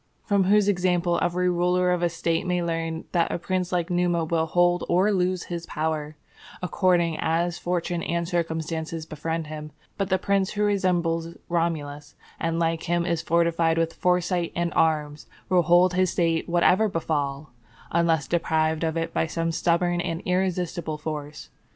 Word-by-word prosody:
From 200 -2 +2
whose 205 +1 +4
example 180 -2 +1
every 180 +1 +1
ruler 180 +1 +2
of 180 -1 0
a 175 - +2
State 165 +1 -1
may 180 -1 0
learn 165 -1 -3
that 170 -2 +1
a - - -1
prince 180 +1 -2
like 175 0 -1
Numa 175 -2 +1
will 160 0 0
hold 175 +1 +2
or 185 +4 +3
lose 185 -2 0
his 170 -1 -6
power 155 -1 -3 0.4
according 175 -2 +1
as 170 +2 0
fortune 175 -1 -2
and 170 0 -2
circumstances 160 -2 -3
befriend 160 +1 -4
him; 150 0 -7 0.3
but 195 -1 -1
that 190 -1 +2
the - - -19
prince 195 -1 +1
who 210 0 0
resembles 175 -5 0
Romulus, 150 -4 -2 0.2
and 165 0 -1
like 165 -1 0
him 175 0 +1
is 170 -2 0
fortified 170 0 +2
with 165 0 0
foresight 180 -1 0
and 170 0 -1
arms, 150 -2 0 0.2
will 180 -2 +4
hold 175 +2 +4
his 185 0 +2
State 165 -1 0
whatever 180 +5 +3
befall, 155 -4 -2 0.4
unless 165 -4 +2
deprived 160 -1 0
of 160 0 -1
it 165 0 -2
by 160 - +1
some 165 0 -2
stubborn 175 +1 +1
and 165 0 -4
irresistible 180 -3 -1
force. 150 -1 -6
170 Hz, 165 wpm, -25 LUFS, 160-180 Hz, 0.4 s, whose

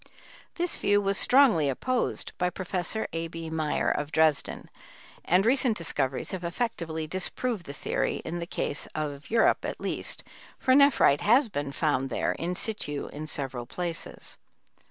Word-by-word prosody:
This 350 0 0
view 205 0 +3
was 200 -1 +1
strongly 240 - +5
opposed 250 - -1
by 180 0 +2
Prof. 185 +4 0
A. 165 0 -2
B. 165 -1 -7
Meyer, 155 -2 0
of 145 +1 -2
Dresden, 155 -2 +1 0.6
and 185 +4 +3
recent 250 -2 +3
discoveries 135 -5 -2
have 185 -2 -5
effectively 170 -4 -2
disproved 185 +4 -3
the - - -5
theory - - -1
in 170 +2 -3
the 170 - -5
case 145 - -2
of 150 -1 -4
Europe 230 0 +3
at - - -4
least, - - -2 0.3
for 260 - +2
nephrite 280 - +5
has 240 +4 +4
been 145 -6 -3
found 140 -3 0
there - - 0
in 175 +2 -3
situ 175 -9 -2
in 155 +1 -6
several 130 -5 -3
places. 170 +3 -5
170 Hz, 155 wpm, -28 LUFS, 150-215 Hz, 0.6 s, strongly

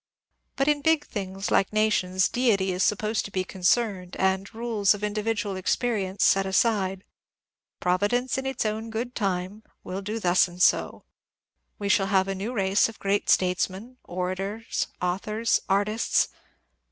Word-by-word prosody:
But 275 - 0
in 295 -1 +2
big 320 0 +2
things 195 -1 -5
like 195 - +3
nations 190 -4 +2
Deity 210 -7 +1
is 180 0 -2
supposed 215 +2 +1
to - - -6
be 185 -1 -1
concerned, 185 0 0
and 190 0 0
rules 220 -3 +1
of 205 - -9
individual 210 -1 -1
experience 195 0 -1
set 195 0 +4
aside. 190 -2 +1
^* - - -34 0.8
Providence 205 +8 +1
in 265 0 -2
its 265 -3 -2
own 220 +1 -2
good 235 +3 -4
time 195 -1 -2
" - - -50
will 190 +2 -5
do 210 +3 -4
thus 180 -2 +3
and 175 0 -13
so. - - +2 0.7
We 200 - -4
shall 195 -1 +3
have 190 -1 +2
a 195 - -1
new 195 +5 -4
race 200 -2 +2
of 225 - -11
great 200 +1 -1
statesmen, 190 +6 0
orators, 190 +5 -3 0.2
authors, 210 +5 0
artists 205 +3 +1
200 Hz, 155 wpm, -26 LUFS, 190-225 Hz, 0.8 s, set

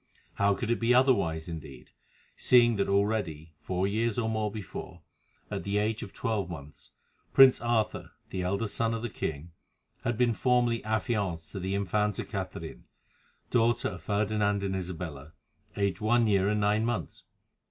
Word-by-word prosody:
How 100 0 +2
could 115 +2 -2
it 120 - +1
be 120 +1 +3
otherwise, 90 -12 +3
indeed, 75 -6 -9 0.4
seeing 120 -3 +5
that 100 - 0
already, 100 -6 0
four 90 +4 -1
years 110 +2 0
or 115 -2 0
more 110 -1 0
before, 105 -3 -8 0.5
at - - -3
the 100 +1 -1
age 110 +1 0
of 105 -5 -7
twelve 105 -6 -2
months, 70 -3 -10 0.4
Prince 135 -1 +7
Arthur, 120 -2 -1 0.2
the 95 - -2
eldest 100 +4 -1
son 115 0 0
of 115 - -5
the 120 - -3
king, 80 -1 -4 0.5
had 120 -2 -1
been 120 -1 +3
formally 120 -1 +2
affianced 105 - -1
to - - -5
the 95 +1 -2
Infanta 105 +1 0
Catherine, - - -6 0.7
daughter 120 -1 +2
of 95 -5 -8
Ferdinand 105 0 0
and 95 -1 -1
Isabella, 85 -5 -6 0.4
aged 100 -2 0
one 115 +2 +3
year 100 -2 +3
and 105 0 +1
nine 105 +2 +2
months? 115 -10 -3
105 Hz, 160 wpm, -29 LUFS, 90-115 Hz, 0.7 s, Prince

